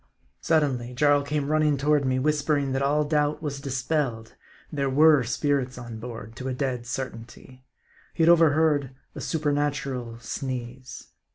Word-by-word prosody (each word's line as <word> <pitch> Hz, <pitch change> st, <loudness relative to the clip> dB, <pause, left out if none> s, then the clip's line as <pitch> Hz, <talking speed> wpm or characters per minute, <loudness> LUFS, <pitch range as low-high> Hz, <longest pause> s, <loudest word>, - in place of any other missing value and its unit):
Suddenly 130 Hz, -6 st, 0 dB
Jarl 145 Hz, +2 st, +4 dB
came 145 Hz, 0 st, -2 dB
running 155 Hz, -2 st, +2 dB
toward 145 Hz, +1 st, +2 dB
me, 130 Hz, 0 st, +1 dB
whispering 145 Hz, 0 st, +1 dB
that 135 Hz, +1 st, -1 dB
all 145 Hz, +2 st, +2 dB
doubt 150 Hz, 0 st, 0 dB
was 140 Hz, -2 st, -4 dB
dispelled; 130 Hz, -4 st, -2 dB, 0.4 s
there 140 Hz, -3 st, -1 dB
were 150 Hz, +1 st, +5 dB
spirits 130 Hz, +1 st, -1 dB
on 120 Hz, -3 st, -8 dB
board, 115 Hz, -2 st, -8 dB
to 130 Hz, -, -5 dB
a 130 Hz, -, -2 dB
dead 125 Hz, -3 st, -3 dB
certainty. 130 Hz, 0 st, -7 dB, 0.5 s
He 165 Hz, -, +2 dB
had 165 Hz, -, +5 dB
overheard 155 Hz, -5 st, +3 dB, 0.2 s
a -, -, -7 dB
supernatural 140 Hz, -6 st, -2 dB
sneeze. 125 Hz, +1 st, -6 dB
140 Hz, 145 wpm, -26 LUFS, 125-150 Hz, 0.5 s, were